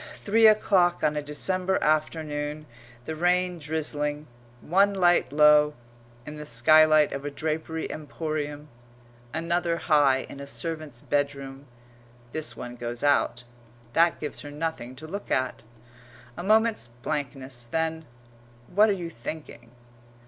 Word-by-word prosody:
Three 220 Hz, +2 st, +4 dB
o'clock 190 Hz, -5 st, +3 dB
on 150 Hz, -, +2 dB
a 150 Hz, -, -1 dB
December 185 Hz, +6 st, 0 dB
afternoon; 155 Hz, -1 st, -1 dB, 0.4 s
the 160 Hz, -, -4 dB
rain 180 Hz, +1 st, +1 dB
drizzling; 150 Hz, -1 st, -2 dB, 0.3 s
one 195 Hz, +7 st, +2 dB
light 175 Hz, -5 st, +3 dB
low 150 Hz, 0 st, +5 dB, 0.5 s
in 150 Hz, 0 st, -8 dB
the 150 Hz, -, -7 dB
skylight 155 Hz, +5 st, +5 dB
of 140 Hz, -, -5 dB
a 145 Hz, -, -3 dB
drapery 160 Hz, +2 st, -3 dB
emporium; 150 Hz, -1 st, -5 dB, 0.6 s
another 170 Hz, +2 st, -1 dB
high 145 Hz, -5 st, +3 dB
in 140 Hz, -, -10 dB
a 140 Hz, -, -7 dB
servant's 155 Hz, -4 st, -4 dB
bedroom 140 Hz, -1 st, -3 dB, 0.6 s
this 120 Hz, -6 st, -4 dB
one 125 Hz, 0 st, -7 dB
goes 120 Hz, +1 st, -5 dB
out. 140 Hz, -4 st, +2 dB, 0.5 s
That 170 Hz, +1 st, +3 dB
gives 150 Hz, -, -5 dB
her 145 Hz, -, -8 dB
nothing 145 Hz, -4 st, -4 dB
to 150 Hz, +5 st, -9 dB
look 200 Hz, +5 st, -6 dB
at. 130 Hz, -1 st, -1 dB, 0.7 s
A -, -, -6 dB
moment's 220 Hz, -, +3 dB
blankness 130 Hz, 0 st, -5 dB
then, 160 Hz, +1 st, -2 dB, 0.7 s
what 210 Hz, +3 st, +5 dB
are -, -, +3 dB
you 175 Hz, -3 st, -5 dB
thinking? 145 Hz, -1 st, -8 dB
155 Hz, 130 wpm, -26 LUFS, 145-170 Hz, 0.7 s, low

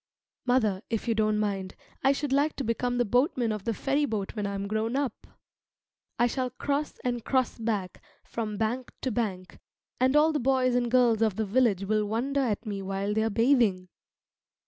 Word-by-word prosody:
Mother, 220 Hz, -7 st, +2 dB
if 225 Hz, +1 st, -2 dB
you 230 Hz, -, +3 dB
don't 215 Hz, -1 st, +1 dB
mind, 195 Hz, -3 st, -2 dB, 0.3 s
I 270 Hz, -, +5 dB
should 280 Hz, 0 st, -1 dB
like 290 Hz, +2 st, +2 dB
to 275 Hz, -, -3 dB
become 245 Hz, +1 st, -1 dB
the 245 Hz, -, +2 dB
boatman 245 Hz, -, +1 dB
of 210 Hz, -2 st, -4 dB
the 230 Hz, -, 0 dB
ferryboat 270 Hz, -8 st, -1 dB
when 205 Hz, -2 st, -2 dB
I 200 Hz, -, -3 dB
am 195 Hz, 0 st, -3 dB
grown 220 Hz, +3 st, -1 dB
up. 275 Hz, -5 st, -2 dB, 0.9 s
I 240 Hz, -, +4 dB
shall 255 Hz, +1 st, -1 dB
cross 285 Hz, +4 st, -2 dB
and 245 Hz, -2 st, -1 dB
cross 255 Hz, -2 st, 0 dB
back 210 Hz, -5 st, -2 dB, 0.2 s
from 215 Hz, -3 st, -4 dB
bank 235 Hz, +4 st, -2 dB
to 260 Hz, -, -1 dB
bank, 195 Hz, -5 st, -3 dB, 0.4 s
and 260 Hz, +2 st, +3 dB
all 305 Hz, +2 st, +5 dB
the 300 Hz, -, 0 dB
boys 255 Hz, -1 st, +2 dB
and 245 Hz, -1 st, +1 dB
girls 240 Hz, -3 st, +3 dB
of 220 Hz, -4 st, +2 dB
the 220 Hz, -, -1 dB
village 210 Hz, -2 st, +2 dB
will 215 Hz, +1 st, +1 dB
wonder 265 Hz, +6 st, 0 dB
at 225 Hz, -3 st, -1 dB
me 200 Hz, -2 st, -4 dB
while 195 Hz, +1 st, -2 dB
they 220 Hz, -, +1 dB
are 220 Hz, -, +1 dB
bathing. 225 Hz, -6 st, +2 dB
230 Hz, 190 wpm, -28 LUFS, 210-255 Hz, 0.9 s, I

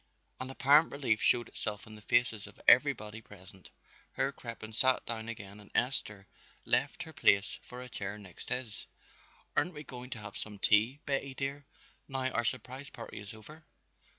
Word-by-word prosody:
An 130 Hz, -, -4 dB
apparent 145 Hz, +4 st, +5 dB
relief 130 Hz, -6 st, +1 dB
showed 120 Hz, -2 st, +4 dB
itself 105 Hz, -1 st, -4 dB
in 110 Hz, -, -10 dB
the 105 Hz, -, -10 dB
faces 110 Hz, -2 st, +2 dB
of -, -, -15 dB
everybody 110 Hz, +1 st, +5 dB
present. 95 Hz, -3 st, -13 dB, 0.4 s
Herr 135 Hz, -, +1 dB
Crippen 115 Hz, -4 st, -8 dB
sat 130 Hz, +3 st, +4 dB
down 115 Hz, -1 st, -1 dB
again 100 Hz, -2 st, -7 dB
and 105 Hz, -, -14 dB
Esther 105 Hz, -6 st, 0 dB, 0.4 s
left -, -, +1 dB
her -, -, -11 dB
place 100 Hz, 0 st, +3 dB
for 125 Hz, 0 st, -9 dB
a -, -, -8 dB
chair 100 Hz, -4 st, -5 dB
next 95 Hz, -5 st, -11 dB
his. 125 Hz, -4 st, -4 dB, 0.7 s
"Aren't 170 Hz, +3 st, +1 dB
we 150 Hz, -, -7 dB
going 125 Hz, -3 st, -6 dB
to 130 Hz, -, -5 dB
have 105 Hz, -1 st, -8 dB
some 105 Hz, -1 st, -6 dB
tea, 110 Hz, +8 st, +3 dB
Betty 135 Hz, -1 st, -1 dB
dear, 140 Hz, +1 st, -3 dB, 0.4 s
now 130 Hz, -1 st, +4 dB
our 120 Hz, -, +1 dB
surprise 130 Hz, +2 st, -3 dB
party 115 Hz, -, -8 dB
is 100 Hz, -1 st, -8 dB
over?" 150 Hz, +9 st, -13 dB
115 Hz, 175 wpm, -32 LUFS, 105-135 Hz, 0.7 s, apparent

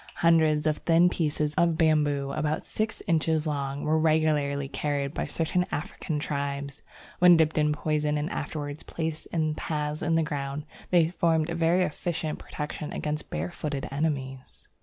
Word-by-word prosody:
Hundreds 160 Hz, -3 st, +3 dB
of 155 Hz, -1 st, +2 dB
thin 170 Hz, +1 st, +4 dB
pieces 150 Hz, -3 st, -1 dB
of 170 Hz, -2 st, +3 dB
bamboo 150 Hz, -4 st, +2 dB
about 155 Hz, +3 st, -1 dB
six 220 Hz, +1 st, -3 dB
inches 160 Hz, -3 st, +1 dB
long 140 Hz, -2 st, -2 dB
were 155 Hz, +1 st, +2 dB
regularly 155 Hz, -3 st, +2 dB
carried 140 Hz, 0 st, -2 dB
by -, -, -2 dB
certain 170 Hz, +2 st, 0 dB
African 160 Hz, -1 st, -3 dB
tribes. 140 Hz, -1 st, -3 dB, 0.4 s
When 180 Hz, -1 st, +8 dB
dipped 160 Hz, -1 st, +2 dB
in 150 Hz, -1 st, +3 dB
poison 150 Hz, 0 st, 0 dB
and 150 Hz, +1 st, -1 dB
afterwards 145 Hz, -2 st, -4 dB
placed 160 Hz, -1 st, -4 dB
in 155 Hz, -2 st, 0 dB
paths 150 Hz, -1 st, -3 dB
in 165 Hz, 0 st, +1 dB
the 165 Hz, -, +3 dB
ground, 145 Hz, -1 st, -3 dB, 0.2 s
they 170 Hz, -3 st, +4 dB
formed 165 Hz, -2 st, +1 dB
a -, -, -2 dB
very 170 Hz, +2 st, +3 dB
efficient 160 Hz, -1 st, -3 dB
protection 150 Hz, 0 st, -5 dB
against 150 Hz, 0 st, -3 dB
barefooted 135 Hz, -, -3 dB
enemies. 135 Hz, -3 st, -3 dB
155 Hz, 155 wpm, -27 LUFS, 145-160 Hz, 0.4 s, When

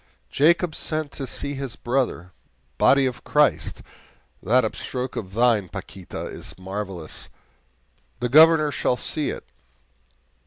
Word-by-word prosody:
'Jacob 165 Hz, +3 st, +3 dB
sent 155 Hz, -2 st, -3 dB
to 135 Hz, -, -6 dB
see 140 Hz, +2 st, -3 dB
his 135 Hz, -3 st, -5 dB
brother' 120 Hz, -8 st, -1 dB, 0.5 s
body 140 Hz, 0 st, +5 dB
of 125 Hz, -2 st, -3 dB
Christ! 150 Hz, -1 st, +1 dB, 0.6 s
that 125 Hz, +6 st, +3 dB
upstroke 125 Hz, +3 st, -4 dB
of 95 Hz, -2 st, -6 dB
thine, 115 Hz, -5 st, +3 dB
Paquita, 95 Hz, -2 st, -7 dB
is -, -, -7 dB
marvelous; 95 Hz, -3 st, -6 dB, 0.9 s
the -, -, 0 dB
Governor 155 Hz, +2 st, +6 dB
shall 125 Hz, -, 0 dB
see 150 Hz, +2 st, 0 dB
it!" -, -, -6 dB
125 Hz, 120 wpm, -24 LUFS, 105-145 Hz, 0.9 s, Governor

